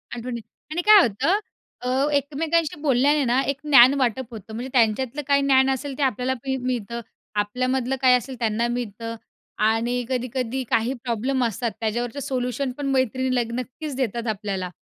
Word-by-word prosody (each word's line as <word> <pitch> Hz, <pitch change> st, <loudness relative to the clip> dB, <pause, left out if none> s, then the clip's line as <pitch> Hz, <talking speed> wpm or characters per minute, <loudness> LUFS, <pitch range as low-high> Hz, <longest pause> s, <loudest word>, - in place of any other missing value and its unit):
आठवणी. 235 Hz, 0 st, -5 dB, 0.3 s
आणि 345 Hz, +3 st, -1 dB
काय 420 Hz, 0 st, +8 dB
होतं 330 Hz, -, +1 dB, 0.4 s
अ, 250 Hz, -, -2 dB, 0.2 s
एकमेकांशी 300 Hz, +2 st, 0 dB
बोलल्याने 285 Hz, +1 st, +3 dB
ना, 250 Hz, +3 st, +2 dB
एक 275 Hz, -1 st, 0 dB
ज्ञान 270 Hz, -2 st, +8 dB
वाटप 255 Hz, 0 st, 0 dB
होतं. 220 Hz, 0 st, -9 dB
म्हणजे 245 Hz, +4 st, -5 dB
त्यांच्यातलं 250 Hz, +4 st, +1 dB
काही 280 Hz, 0 st, +4 dB
ज्ञान 265 Hz, -1 st, +4 dB
असेल 270 Hz, 0 st, -3 dB
ते 290 Hz, -, 0 dB
आपल्याला 260 Hz, 0 st, 0 dB
मी 265 Hz, 0 st, 0 dB
मिळतं. 235 Hz, -2 st, -3 dB, 0.3 s
आपल्यामधलं 255 Hz, +5 st, 0 dB
काय 255 Hz, -1 st, +6 dB
असेल 255 Hz, +2 st, -7 dB
त्यांना 230 Hz, +1 st, 0 dB
मिळतं 230 Hz, -1 st, -4 dB, 0.5 s
आणि 240 Hz, +2 st, 0 dB
कधी-कधी 255 Hz, 0 st, -2 dB
काही 230 Hz, +4 st, +1 dB
प्रॉब्लेम 250 Hz, +2 st, 0 dB
असतात 230 Hz, +1 st, -2 dB
त्याच्यावरचं 240 Hz, +4 st, -2 dB
सोल्युशन 255 Hz, 0 st, -2 dB
पण 285 Hz, -, -4 dB
मैत्रिणी 260 Hz, 0 st, +1 dB
ल 245 Hz, -, +2 dB, 0.2 s
नक्कीच 270 Hz, +3 st, -6 dB
देतात 235 Hz, -2 st, -2 dB
आपल्याला. 195 Hz, -3 st, -3 dB
255 Hz, 160 wpm, -23 LUFS, 235-270 Hz, 0.5 s, काय